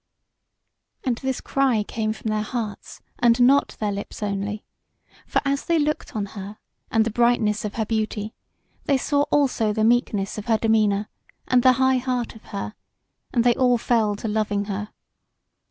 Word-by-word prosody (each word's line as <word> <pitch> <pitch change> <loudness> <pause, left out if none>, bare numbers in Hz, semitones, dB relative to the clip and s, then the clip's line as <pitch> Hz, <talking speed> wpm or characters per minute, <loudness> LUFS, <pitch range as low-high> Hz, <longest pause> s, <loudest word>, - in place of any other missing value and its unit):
And 250 -4 0
this 265 0 -2
cry 260 -6 +1
came 215 +1 -2
from 220 0 -4
their 215 0 0
hearts, 215 -2 -5 0.2
and 235 0 +4
not 265 +3 +4
their 210 -1 0
lips 200 +1 -6
only; 205 +1 -3 0.6
for - - +1
as 280 0 0
they 335 - +2
looked 300 -4 -1
on 210 -2 -1
her, 200 +1 -7 0.3
and 225 -1 +3
the 230 - -1
brightness 230 -2 +2
of 210 - -5
her 220 - -1
beauty, 215 -1 -2 0.5
they 280 - +3
saw 285 +2 +1
also 260 -7 +2
the 215 +1 0
meekness 220 -4 +1
of 210 - -9
her 225 -2 +3
demeanour, 215 -2 +2 0.4
and 250 -1 +4
the 255 +1 +6
high 260 +1 +3
heart 250 -1 -2
of 225 - -16
her, 200 +1 -5 0.6
and 235 - +2
they 240 0 +5
all 250 -1 +3
fell 225 -3 +1
to 215 - -5
loving 210 -1 0
her. 205 +1 -4
225 Hz, 170 wpm, -23 LUFS, 210-250 Hz, 0.6 s, the